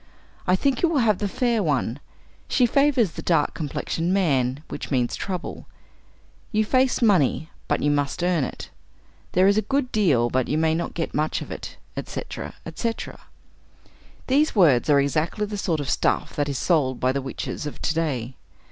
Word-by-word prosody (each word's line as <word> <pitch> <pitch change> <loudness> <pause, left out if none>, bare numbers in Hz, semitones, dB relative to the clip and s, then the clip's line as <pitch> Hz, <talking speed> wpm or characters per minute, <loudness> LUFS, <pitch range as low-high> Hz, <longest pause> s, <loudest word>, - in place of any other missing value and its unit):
I 180 - +5
think 265 +5 0
you 345 - +3
will 325 - +1
have 215 -4 +2
the 205 - 0
fair 235 +2 0
one. 140 - 0 0.5
She 250 - +3
favors 265 - +3
the - - -7
dark 165 -4 +2
complexioned 165 +3 -2
man, 140 -8 +1
which - - -6
means 125 -4 0
trouble. 185 -2 -5 0.8
You 215 -1 +2
face 255 +2 +2
money, 160 - +2 0.2
but - - 0
you 145 - +3
must 145 +2 -1
earn 175 -4 +2
it. - - -6 0.6
There 185 +1 +4
is 200 +2 +4
a - - +1
good 270 +1 -1
deal, 140 - +2
but 130 -1 +1
you 150 - 0
may 160 0 +2
not 170 +1 -3
get 165 - -3
much 155 +1 0
of - - -11
it" - - -7 0.2
etc., - - -6
etc. 230 -1 -4 1.0
These 285 +2 +2
words 155 - +4
are 145 -1 +6
exactly 155 +9 0
the 210 0 -5
sort 175 -6 -1
of 145 - -4
stuff - - 0
that 145 0 0
is 140 - -2
sold 135 -7 +1
by 130 - +2
the 140 +1 -2
witches 135 +3 -5
of 150 - -7
to 160 - +1
day. 135 -7 -2
165 Hz, 185 wpm, -24 LUFS, 140-210 Hz, 1.0 s, are